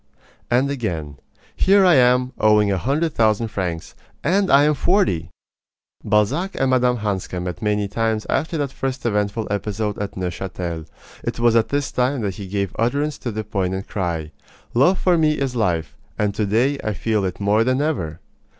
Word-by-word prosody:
And 130 +4 +2
again: 80 - -4 0.4
Here 195 0 +4
I 180 - +6
am, 125 -1 +4
owing 105 -1 +4
a 95 - +1
hundred 150 - 0
thousand 110 0 +2
francs. 90 -5 -4 0.3
And 190 +5 +2
I 140 +1 +7
am 150 +1 +4
forty! 160 - +1 0.7
Balzac 140 - +1
and 135 -1 +1
Mme. 125 -1 +3
Hanska 100 -4 -3
met 90 0 -5
many 105 -1 0
times 110 +1 -1
after 160 +2 -1
that 145 -3 -2
first 130 -2 -4
eventful 105 0 0
episode 105 0 -2
at 100 -1 -5
Neuchatel. 90 -3 -4 0.4
It - - -3
was 120 -1 +3
at 115 -1 +3
this 145 -1 -1
time 125 +1 0
that 100 -3 -2
he 100 - -7
gave 100 -1 -2
utterance 140 +6 0
to 120 - -4
the 110 0 -4
poignant 95 -2 -2
cry: 85 -5 -3 0.4
Love 140 +11 +4
for 180 -2 +2
me 155 -1 +3
is 135 -4 -2
life, 90 -8 -1 0.2
and 105 -1 0
to 105 0 -1
day 125 +7 +1
I 110 - -1
feel 110 -1 0
it 95 -2 -3
more 105 +2 +3
than 130 +2 +1
ever! 90 - -2
110 Hz, 175 wpm, -21 LUFS, 100-135 Hz, 0.7 s, I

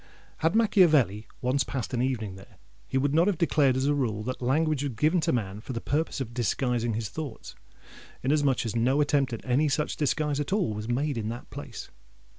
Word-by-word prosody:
Had 165 +5 +1
Machiavelli 155 - +4
once 130 +2 +1
passed 130 -2 -4
an 120 - 0
evening 115 -6 -1
there, 95 - -15 0.3
he 135 - -1
would 140 +1 +1
not 165 +4 +4
have 200 -5 +1
declared 145 -6 +3
as 130 - 0
a 145 - +3
rule 115 -7 -1
that 130 +3 -4
"language 150 +3 +1
was 140 -3 -2
given 155 +10 +2
to - - +1
man 105 -4 -2
for 130 - -6
the 115 - -2
purpose 150 +6 -1
of 120 -3 -4
disguising 120 -1 0
his 110 -2 -3
thoughts;" 150 -8 -7 0.7
inasmuch 140 -2 +2
as 115 - -3
no 125 +5 +2
attempt 145 -2 +2
at 115 - -6
any 135 +4 +2
such 150 +3 -1
disguise 150 0 0
at 145 - -3
all 190 - +1
was 105 +1 -5
made 135 +1 0
in 110 0 -3
that 120 +1 -7
place. - - -8
135 Hz, 210 wpm, -27 LUFS, 115-150 Hz, 0.7 s, Machiavelli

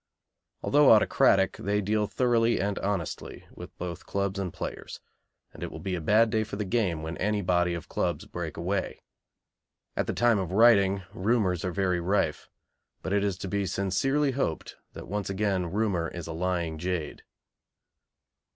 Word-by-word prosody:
Although 145 0 +5
autocratic, 95 -3 +4
they 105 +1 0
deal 105 +1 0
thoroughly 115 +1 +2
and 100 0 -1
honestly 95 -5 -4
with - - -11
both 85 -1 -6
clubs 100 0 -1
and 95 -3 -3
players, - - -6 0.5
and - - -13
it - - -3
will - - -8
be 95 - -4
a 90 - -2
bad 110 +7 +4
day 110 -1 +1
for 105 - -7
the 105 0 -3
game 95 -7 0
when 80 +1 -5
any 105 +1 0
body 90 -1 +2
of 85 - -7
clubs - - -2
break - - -6
away. 95 +3 -2 0.9
At - - -1
the - - -1
time 120 -3 +3
of 95 -1 -3
writing 100 -3 +5
rumours 95 -4 +1
are 90 - -1
very 90 -1 0
rife, 85 -3 0 0.5
but 95 - -2
it 100 0 +2
is 100 -3 -1
to 95 - -6
be 100 0 -1
sincerely 135 - +1
hoped 125 - -3 0.2
that - - -9
once 100 +1 -3
again 95 -2 0
"rumour 100 -5 0
is 85 0 -7
a 80 - -5
lying 85 -2 -2
jade." 90 -3 -3
95 Hz, 170 wpm, -28 LUFS, 90-105 Hz, 0.9 s, Although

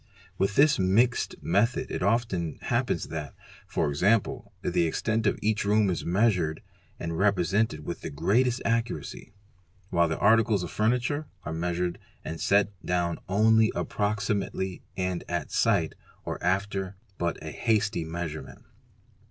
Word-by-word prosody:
With 100 +2 +1
this 150 -1 +5
'mixed'? 110 +6 +2
method 105 +8 +1
it - - -3
often 95 -5 0
happens - - 0
that, 75 -4 -5 0.4
e.g., 70 0 +1 0.7
the 85 - +2
extent 110 +6 0
of - - +1
each 110 0 +1
room 105 -1 +3
is 85 - -3
measured 90 -5 +1 0.4
and 85 -1 -3
represented 100 -3 +1
with - - -5
the - - -5
greatest 115 - +1
accuracy; 115 0 -2 0.6
while 85 -1 +3
the 80 - -2
articles 110 -3 +4
of 90 - -5
furniture 125 +7 0 0.2
are 80 - -3
measured 85 +1 -2 0.3
and 80 0 -5
set 100 0 +3
down 85 -1 0
only 110 +3 +4
approximately 100 -2 -1 0.2
and 90 -1 -1
at 85 -1 -2
sight - - +2 0.3
or - - -5
after 95 +1 -1 0.2
but 85 -1 -1
a 80 - -5
hasty 110 -4 +1
measurement. 80 -1 -6
95 Hz, 135 wpm, -27 LUFS, 85-110 Hz, 0.7 s, this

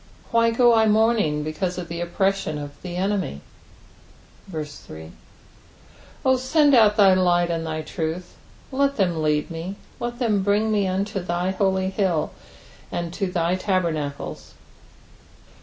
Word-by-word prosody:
why 230 0 +4
go 240 +1 +4
I 220 -1 +4
mourning 215 -9 +2
because 175 +4 -3
of 180 -2 -5
the 170 0 -5
oppression 190 -2 0
of 145 -1 -6
the 180 -1 -6
enemy? 190 - -1 1.1
3 145 - -8 1.1
O 260 0 +4
send 285 +3 +3
out 215 -4 +6
thy 195 -3 +7
light 175 -2 +2
and 165 -1 -2
thy 155 0 -3
truth: 165 +2 -4 0.4
let 280 +1 +1
them 175 -6 +1
lead 150 +2 0
me; 165 +4 -5 0.2
let 240 0 -4
them 220 -5 +1
bring 205 +3 +1
me 205 -2 +2
unto 195 +2 -1
thy 175 +1 -1
holy 190 -1 0
hill, 185 -6 0 0.6
and 170 -1 -3
to 195 0 -1
thy 175 -1 +1
tabernacles. 170 -7 -2
185 Hz, 140 wpm, -23 LUFS, 165-210 Hz, 1.1 s, thy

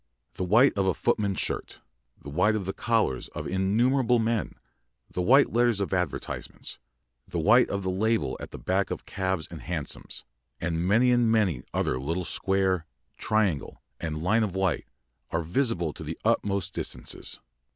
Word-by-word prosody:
The - - -3
white 115 +9 +5
of 100 -1 +1
a 95 - +2
footman's 105 -5 0
shirt, - - -3 0.4
the 70 - -9
white 95 +8 +3
of 100 -3 -2
the 95 - -2
collars 115 - 0
of - - -4
innumerable 120 +7 +2
men, 115 -2 0 0.6
the 90 - -2
white 135 +10 +5
letters 120 -3 +3
of 100 -1 -2
advertisements, 90 -5 -3 0.5
the - - -4
white 110 +10 +5
of 100 0 -2
the 95 - 0
label 110 +4 +1
at - - -7
the - - -8
back - - 0
of - - -5
cabs 95 -4 -2
and 85 - -8
hansoms, 85 -5 -4 0.3
and 85 +1 -1
many 120 +5 +4
and 120 -2 +3
many 95 - +2
another 65 - 0
little 85 +7 -2
square, 95 -4 +1 0.3
triangle, 105 -9 0 0.2
and 80 -1 -3
line 110 +6 +3
of 100 -4 -1
white, 95 -3 0 0.4
are 80 +1 -1
visible 90 - 0
to - - -8
the - - -5
utmost 100 -2 +1
distances. - - -5
95 Hz, 165 wpm, -27 LUFS, 90-110 Hz, 0.6 s, white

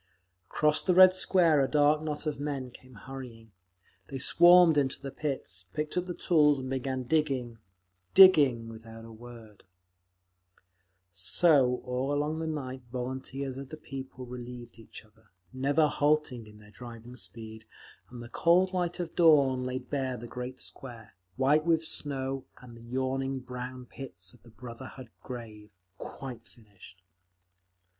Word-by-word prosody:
Across 150 0 +1
the 180 - +1
Red 185 0 +9
Square 175 -5 +3
a 135 - +2
dark 150 0 +3
knot 155 0 -4
of 150 -2 -3
men 140 -3 -4
came 130 0 -16
hurrying. 115 -2 -10 0.6
They 135 - -6
swarmed 175 +4 +6
into 140 -2 +1
the 135 -1 -7
pits, 130 - -5
picked 150 0 -3
up 180 0 -1
the 175 - -5
tools 150 -4 +3
and 130 0 -6
began 130 0 -2
digging, 130 -5 -1 0.6
digging, 145 -12 +7
without 115 0 -11
a 115 - -12
word…. 115 -2 -13 1.5
So, 125 - +3
all 125 +1 -2
the 145 - 0
long 155 +2 -2
night 130 -3 -5
volunteers 130 +1 -5
of 135 -1 -9
the 155 - -8
People 135 -3 -8
relieved 120 -1 -9
each 110 0 -12
other, 110 0 -28 0.2
never 140 +4 +2
halting 145 -6 0
in 105 0 -15
their 105 0 -17
driving 120 +1 -11
speed, 110 -2 -9 0.4
and 120 -1 -9
the 120 - -10
cold 180 +7 +3
light 175 -1 -2
of 175 -2 -3
the - - -31
dawn 140 -7 +5
laid 130 0 -5
bare 130 -3 -2
the 120 - -9
great 125 +2 -7
Square, 115 -3 -8 0.2
white 145 +4 +3
with 165 -1 +1
snow, 135 -3 -2
and 125 -2 -13
the 115 - -14
yawning 130 +2 -2
brown 125 0 -7
pits 95 -9 -8
of - - -20
the 115 - -18
Brotherhood 125 +1 -10
Grave, 110 -4 -9 0.3
quite 130 -4 -8
finished. 100 -5 -17
130 Hz, 150 wpm, -29 LUFS, 120-150 Hz, 1.5 s, Red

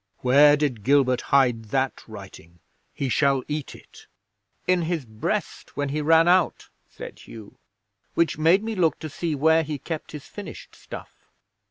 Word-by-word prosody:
Where 145 +3 +6
did 135 -8 -2
Gilbert 130 -1 +3
hide 125 -5 +3
that 130 +4 -1
writing? 95 -5 -12 0.3
He 140 - -3
shall 135 0 +2
eat 150 -1 -4
it." - - -17 0.6
'"In 180 -1 +2
his 165 -4 -2
breast 110 +4 -4
when 145 -1 -1
he 150 +2 -2
ran 165 +2 +4
out," 180 -1 +2 0.2
said - - -10
Hugh. 110 -3 -13 0.6
"Which 170 -2 +2
made 165 +6 +3
me 225 0 -3
look 175 -6 +1
to 155 - -7
see 165 0 -2
where 160 +3 +4
he 150 -1 -4
kept 160 +4 -6
his 150 -3 -8
finished 205 - -10
stuff. - - -12
145 Hz, 160 wpm, -24 LUFS, 130-160 Hz, 0.6 s, Where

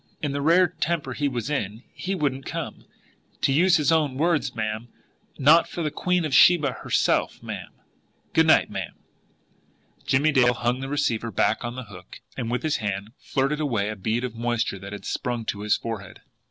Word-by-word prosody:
"In 145 - -2
the 140 0 -2
rare 170 +5 +5
temper 165 -5 -2
he 145 +3 0
was 125 -1 -3
in, 110 -4 -3
he 195 +2 -3
wouldn't 135 -5 -2
come, - - -5 0.6
to 135 - +2
use 175 +5 +5
his 150 -1 +2
own 150 -5 +2
words, 165 +1 +1
ma'am, 110 +1 -3 0.5
not 155 +5 +5
for 170 - -4
the 150 - -1
Queen 180 +2 0
of 150 - -3
Sheba 150 -1 +6
herself, - - +1
ma'am. - - -6 0.6
Good - - +4
night, - - +5
ma'am." - - -5 1.1
Jimmie 145 +4 +3
Dale 125 -3 +4
hung 120 +2 0
the 135 0 -5
receiver 140 -6 0
back 110 +1 +1
on 120 +1 -4
the 130 - -5
hook 95 -5 -12 0.2
and 115 - -3
with 125 +1 -2
his 155 -2 +1
hand 100 -1 -4
flirted 140 +2 -1
away 115 -9 0
a 110 - -4
bead 110 +5 -1
of 125 -3 -3
moisture 115 -3 -1
that 100 +1 -9
had 100 -2 -8
sprung 120 -2 -3
to 100 - -3
his 105 0 +2
forehead. 105 -4 -7
130 Hz, 190 wpm, -25 LUFS, 110-150 Hz, 1.1 s, Sheba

